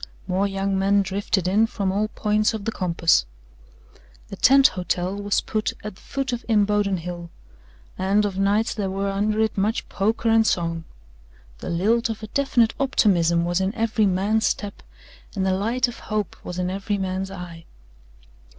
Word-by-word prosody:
More 190 +2 0
young 195 0 -1
men 200 +1 +3
drifted 190 -1 -1
in 210 +4 +3
from 200 -4 -2
all 205 +2 0
points 215 +1 0
of 205 -2 -6
the 225 - 0
compass. 170 - +2 1.0
A - - -4
tent 270 +1 +6
hotel 180 +1 -2
was 205 0 0
put 215 0 -2
at 210 -1 -5
the - - -20
foot 270 -2 -3
of 240 - -4
Imboden 205 -2 +2
Hill, 175 0 -7 0.7
and 200 +3 +2
of 195 -2 -3
nights 205 +3 +2
there 200 -4 -2
were 195 +1 -2
under 210 +2 0
it 220 -2 0
much 215 +4 0
poker 220 +3 0
and 225 0 +4
song. 165 -1 -1 0.7
The - - -6
lilt 220 +8 +1
of 220 0 -5
a - - -5
definite 250 -4 +2
optimism 175 -10 +2
was 175 +2 0
in 190 +4 -1
every 225 -2 +1
man's 200 +4 +1
step 205 -1 -3 0.5
and 190 -1 0
the 190 - +2
light 230 +7 +1
of 240 - -8
hope 215 -4 -3
was 180 - -6
in 180 0 -1
every 200 +2 -2
man's 190 0 -3
eye. 175 -3 -9
200 Hz, 175 wpm, -23 LUFS, 185-220 Hz, 1.0 s, tent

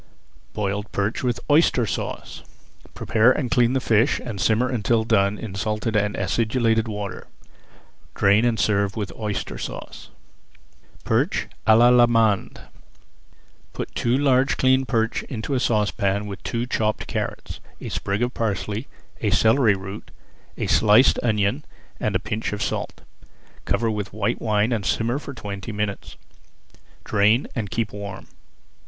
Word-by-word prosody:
BOILED 105 0 -3
PERCH 100 +2 -1
WITH 125 -2 -1
OYSTER 145 -5 +4
SAUCE 100 - -5 0.5
Prepare 115 +2 +3
and 125 -3 -3
clean 120 0 +3
the 135 - +2
fish 115 +1 +2
and 105 -6 -6
simmer 115 +4 +2
until 115 -2 +1
done 100 -2 +2
in 110 -4 -7
salted 105 +2 -2
and 105 0 +1
acidulated 115 +3 +1
water. 105 -2 -6 0.9
Drain 100 +3 +4
and 120 -3 +1
serve 100 0 +1
with 105 -4 -4
Oyster 105 -2 -4
Sauce. - - -8 0.9
PERCH - - 0 0.2
À 110 0 +7
L'ALLEMANDE 120 -3 +4 1.1
Put - - -6
two 120 +2 +1
large 135 -1 +2
cleaned 130 0 +3
perch 115 -2 0
into 125 +2 -4
a 130 - +2
saucepan 105 -3 0
with 100 -2 -7
two 115 +1 -2
chopped 110 -3 -1
carrots, - - -5 0.2
a - - -6
sprig 100 +4 -2
of 125 +1 -1
parsley, 105 +1 -2 0.3
a - - +1
celery 110 -2 +4
root, 95 +2 -8 0.5
a - - -2
sliced 110 +4 +5
onion 110 +4 0 0.4
and 105 -2 -1
a - - +3
pinch 105 +2 -3
of 105 - -2
salt. - - -4 0.6
Cover 115 -1 +1
with 105 -2 -4
white 110 +3 -1
wine 110 +1 +1
and 110 -4 -1
simmer 115 +7 0
for 140 -2 -9
twenty 100 -2 -6
minutes. 105 -1 -4 0.9
Drain 105 +5 +3
and 110 -4 -3
keep 115 0 -2
warm. 100 -2 -7
110 Hz, 140 wpm, -23 LUFS, 105-120 Hz, 1.1 s, À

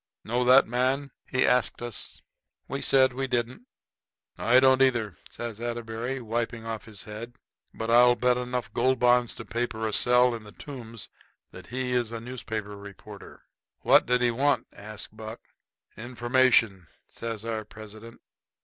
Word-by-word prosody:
"Know 120 +3 0
that 130 +2 +7
man?" 130 +4 0 0.2
he 130 - +2
asked 125 -1 +2
us. 120 -3 -6 0.4
We 140 - -4
said 130 -1 +4
we 135 +1 -2
didn't. 125 - -2 0.7
"I 125 +2 +4
don't 130 0 +4
either," 115 - +1
says 115 -2 -7
Atterbury, 120 +2 -4
wiping 115 0 -3
off 115 -1 -5
his 110 -4 -10
head; 115 +3 -8 0.4
"but 115 +1 -4
I'll 120 +1 +6
bet 125 0 +2
enough 125 -4 -4
Gold 130 +2 +2
Bonds 125 -1 +3
to 115 - -8
paper 115 -2 -2
a 110 - -3
cell 125 0 +4
in 115 -2 -6
the 105 - -13
Tombs 115 -6 -9 0.4
that 90 0 -12
he's 125 -2 -1
a 115 - -5
newspaper 110 -4 -6
reporter." 100 -1 -12 0.4
"What - - +5
did 125 0 +2
he 120 - +3
want?" 140 +4 +1
asks 105 +1 -8
Buck. 110 +1 -8 0.6
"Information," 120 - +2 0.2
says 115 -1 -6
our 110 -1 -3
president. 110 +2 -12
120 Hz, 150 wpm, -27 LUFS, 110-125 Hz, 0.7 s, that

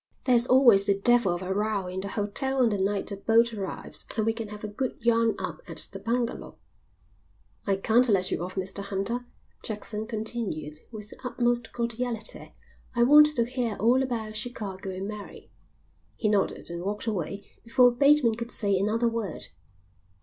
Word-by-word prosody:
"There's 245 -1 +4
always 240 -7 +6
the 200 -1 +3
devil 235 -1 +3
of 175 - -6
a 185 +1 -2
row 205 -1 -1
in 185 +1 -4
the 200 - -5
hotel 220 +7 -2
on 235 - +4
the 205 -2 -1
night 200 +1 -1
a 200 - -4
boat 230 +3 +3
arrives 195 -3 -1
and 215 - +1
we 225 - +2
can 225 -1 -5
have 210 0 -9
a - - -2
good 245 +5 -4
yarn 230 -1 +2
up - - -5
at - - -1
the 195 - -7
bungalow." 235 +3 -3 1.1
"I 195 - +3
can't 230 +5 +3
let 190 -3 +2
you - - -1
off, 185 +1 -6
Mr 190 +1 -3
Hunter," 200 +5 -3 0.3
Jackson 215 0 -5
continued 215 -10 -4
with 210 -2 -8
the - - -13
utmost 240 -1 0
cordiality. 235 -1 -3 0.4
"I 235 - +4
want 300 +4 +8
to 235 - +2
hear 240 -3 -2
all 235 +7 +3
about 225 -5 -3
Chicago 205 -5 -5
and 190 +1 -5
Mary." 210 -1 -9 0.6
He 215 - 0
nodded 200 -4 -1
and 170 0 -5
walked 205 +4 -3
away 200 -2 -3 0.2
before 245 +1 +5
Bateman 280 -1 +4
could 235 +1 -5
say 200 -4 +1
another 220 +4 +1
word. 225 -7 -4
220 Hz, 180 wpm, -27 LUFS, 200-240 Hz, 1.1 s, want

